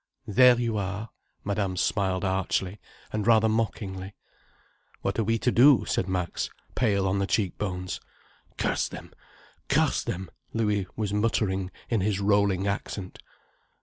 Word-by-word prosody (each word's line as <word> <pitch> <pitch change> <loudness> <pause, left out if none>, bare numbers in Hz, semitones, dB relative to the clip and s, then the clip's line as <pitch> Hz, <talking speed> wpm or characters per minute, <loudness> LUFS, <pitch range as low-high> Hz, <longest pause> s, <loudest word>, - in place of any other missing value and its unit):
There 125 +3 +6
you 115 -3 0
are!" 100 +3 -3 0.3
Madame 100 -2 -1
smiled 95 0 0
archly, 95 +1 -1 0.3
and 105 0 -1
rather 110 -1 +5
mockingly. 100 -4 -2 0.9
"What 100 +3 -1
are - - +3
we 115 +2 +1
to 125 - +1
do?" 130 +2 +6
said 95 - -1
Max, 90 -2 -2 0.2
pale 100 -5 +2
on 95 +1 +1
the 100 - 0
cheekbones. 95 -3 -2 0.6
"Curse - - 0
them! - - -10 0.6
Curse - - +2
them!" 95 0 -4 0.2
Louis 105 -4 0
was 105 -2 -2
muttering, 105 -3 0 0.2
in 115 -4 +1
his 100 0 0
rolling 100 -1 +2
accent. 100 -1 -4
100 Hz, 135 wpm, -27 LUFS, 95-110 Hz, 0.9 s, There